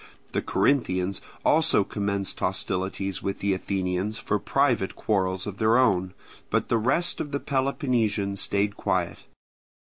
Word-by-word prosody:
The - - 0
Corinthians 95 -9 +1 0.2
also 155 -9 +4
commenced 100 -1 -2
hostilities 95 +1 -2
with 95 - -2
the 100 0 0
Athenians 95 +2 -2
for 105 - -1
private 130 -5 +1
quarrels 95 -3 0
of 100 -1 -6
their 110 +2 +4
own; 95 -7 +2 0.3
but - - 0
the 115 - +3
rest 130 +10 +1
of 145 - -5
the 140 - -1
Peloponnesians 120 -8 0
stayed 100 0 0
quiet. - - -1
100 Hz, 130 wpm, -26 LUFS, 95-120 Hz, 0.3 s, also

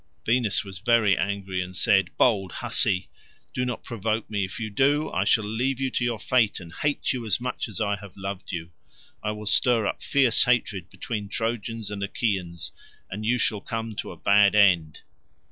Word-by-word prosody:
Venus 115 -3 +2
was 95 -2 -8
very 110 -2 +4
angry, 95 0 -2
and 90 0 -6
said, 95 +1 +3
"Bold 100 -7 +2
hussy, 90 -1 +1 0.5
do 125 - -1
not 125 -1 -3
provoke 110 -1 -2
me; 100 -2 0
if 95 +4 -5
you 110 -2 -4
do, 145 +7 +2
I 95 - 0
shall 110 - +4
leave 120 +5 -1
you 135 -1 -1
to - - -1
your 120 -2 0
fate 115 -1 +2
and 85 -2 -11
hate 145 +4 0
you 125 -2 -4
as 110 -1 0
much 125 0 -3
as 105 - -6
I 100 -2 0
have 100 -2 -13
loved 95 0 -6
you. 85 -2 -5 0.5
I 105 - -2
will 105 0 -5
stir 110 +3 +3
up - - -2
fierce 130 -5 +3
hatred 105 -8 0
between 105 -4 -5
Trojans 115 -1 -3
and 100 -1 -5
Achaeans, 95 - -2 0.4
and 105 +2 -4
you 125 +2 +3
shall 105 -3 0
come 115 -1 -4
to - - -4
a - - -9
bad 100 0 +4
end." 90 -7 +4
105 Hz, 195 wpm, -25 LUFS, 95-120 Hz, 0.5 s, very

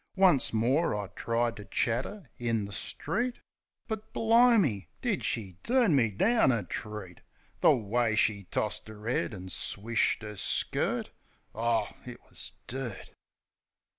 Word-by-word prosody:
Once 185 -8 +4
more 125 +7 +2
I 100 -2 -4
tried 115 +3 -1
ter 105 - -8
chat 115 +5 0
'er 205 -8 -10
in 115 -3 0
the 100 - -9
street. 240 - -2 0.5
But, 220 -1 -5
bli'me! 225 - +4
Did - - -1
she 95 -6 -3
turn 240 - +3
me 120 -5 +4
down 200 - +3
a 115 -5 0
treat! 100 -1 -7 0.4
The - - +6
way 115 0 0
she 105 -2 +2
tossed 100 - -2
'er 105 0 -10
'ead 125 - 0
an' 95 -3 -8
swished 110 +5 0
'er 105 -1 -7
skirt! - - +1 0.4
Oh, 115 -2 +1 0.2
it 125 -1 -9
wus - - -6
dirt! 120 -4 -6
115 Hz, 140 wpm, -29 LUFS, 105-150 Hz, 0.5 s, The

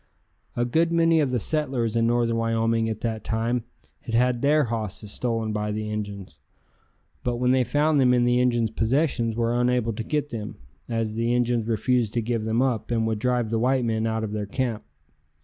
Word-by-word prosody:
A 120 - +1
good 165 +7 +1
many 165 -1 +4
of 145 -3 +2
the 125 - 0
settlers 130 -4 -1
in 115 0 +2
northern 120 -1 +1
Wyoming 115 0 +1
at 110 - -4
that 110 -2 -3
time 115 +1 -1 0.3
had 115 - -4
had 125 0 +2
their 150 +2 +4
hosses 110 -3 -4
stolen 115 -3 -2
by 105 0 -2
the 105 0 -3
Injuns, 100 -3 -6 0.8
but 120 -1 0
when 125 +1 +1
they 130 0 +3
found 150 +3 +2
them 125 -2 +4
in 120 -1 +3
the 120 0 +3
Injuns' 120 -3 +1
possession 120 +1 +1
were 115 0 0
unable 120 -1 +1
to 110 - -4
get 150 +4 -2
them, 110 -4 -6 0.3
as 115 -2 -1
the 115 +1 +1
Injuns 120 -2 +1
refused 115 0 0
to 120 - +2
give 115 -1 -2
them 115 +3 +1
up 125 -5 -1
and 115 -2 +1
would 110 -1 -1
drive 125 -1 0
the 115 - +1
white 130 +1 +2
men 110 -1 0
out 110 0 -1
of 105 - -3
their 105 -1 -3
camp. 115 -1 -2
115 Hz, 200 wpm, -25 LUFS, 110-125 Hz, 0.8 s, many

